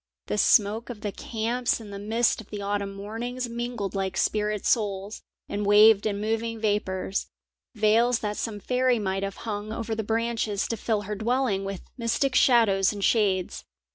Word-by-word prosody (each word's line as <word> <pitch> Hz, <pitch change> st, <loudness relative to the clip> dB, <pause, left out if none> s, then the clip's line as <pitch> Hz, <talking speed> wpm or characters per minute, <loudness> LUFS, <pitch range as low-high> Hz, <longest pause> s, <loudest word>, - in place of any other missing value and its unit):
The 210 Hz, -, -2 dB
smoke 215 Hz, +4 st, +3 dB
of 225 Hz, -4 st, -7 dB
the 205 Hz, -, -3 dB
camps 235 Hz, +4 st, -1 dB
and 210 Hz, -3 st, -10 dB
the 200 Hz, -, -6 dB
mist 225 Hz, +3 st, +1 dB
of 215 Hz, -, -17 dB
the 210 Hz, -, -6 dB
autumn 200 Hz, 0 st, -2 dB
mornings 235 Hz, +5 st, -4 dB
mingled 235 Hz, -3 st, -4 dB
like 195 Hz, -1 st, -2 dB
spirit 210 Hz, -1 st, 0 dB
souls, 205 Hz, -2 st, 0 dB, 0.3 s
and 205 Hz, +1 st, -3 dB
waved 210 Hz, +1 st, +6 dB
in 200 Hz, -1 st, -2 dB
moving 225 Hz, +1 st, -2 dB
vapours, 200 Hz, -3 st, -1 dB, 0.5 s
veils 225 Hz, +3 st, +3 dB
that 210 Hz, -1 st, -2 dB
some 215 Hz, -2 st, -4 dB
fairy 250 Hz, +3 st, +1 dB
might 195 Hz, -2 st, -2 dB
have 195 Hz, 0 st, -3 dB
hung 210 Hz, -1 st, -4 dB
over 225 Hz, 0 st, -3 dB
the 220 Hz, -, -1 dB
branches 225 Hz, -2 st, -1 dB
to 230 Hz, -, -1 dB
fill 215 Hz, 0 st, -1 dB
her 210 Hz, +1 st, -4 dB
dwelling 220 Hz, -2 st, 0 dB
with 195 Hz, -1 st, -5 dB, 0.2 s
mystic 235 Hz, +3 st, 0 dB
shadows 220 Hz, -7 st, +4 dB
and 205 Hz, -2 st, -6 dB
shades. 195 Hz, -5 st, +1 dB
215 Hz, 170 wpm, -26 LUFS, 200-230 Hz, 0.5 s, waved